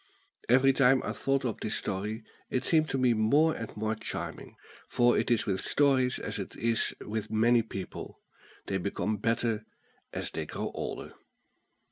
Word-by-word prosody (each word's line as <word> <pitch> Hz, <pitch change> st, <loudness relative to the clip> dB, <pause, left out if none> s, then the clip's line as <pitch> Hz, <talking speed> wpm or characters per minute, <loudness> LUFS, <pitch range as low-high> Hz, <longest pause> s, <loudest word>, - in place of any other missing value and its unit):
Every 135 Hz, +2 st, +6 dB
time 130 Hz, -1 st, +4 dB
I -, -, -2 dB
thought 135 Hz, -1 st, 0 dB
of 115 Hz, -, -2 dB
this 110 Hz, -, -2 dB
story, 105 Hz, +3 st, -3 dB, 0.3 s
it 130 Hz, -, -1 dB
seemed 155 Hz, -2 st, +3 dB
to 135 Hz, -, 0 dB
me 125 Hz, -2 st, +4 dB
more 140 Hz, +9 st, +3 dB
and 115 Hz, -, -5 dB
more 110 Hz, +1 st, 0 dB
charming; 110 Hz, 0 st, -5 dB, 0.3 s
for 120 Hz, 0 st, +3 dB
it -, -, +1 dB
is 120 Hz, -2 st, +2 dB
with 95 Hz, -3 st, -1 dB
stories 130 Hz, -3 st, +2 dB
as -, -, -4 dB
it -, -, -6 dB
is 115 Hz, -1 st, +1 dB
with 110 Hz, 0 st, -4 dB
many 115 Hz, +2 st, +4 dB
people 95 Hz, -4 st, -7 dB, 0.5 s
they 95 Hz, -, -1 dB
become 100 Hz, +3 st, -1 dB
better 115 Hz, 0 st, 0 dB, 0.5 s
as -, -, -3 dB
they -, -, -4 dB
grow -, -, -4 dB
older. -, -, -5 dB
115 Hz, 165 wpm, -29 LUFS, 110-130 Hz, 0.5 s, Every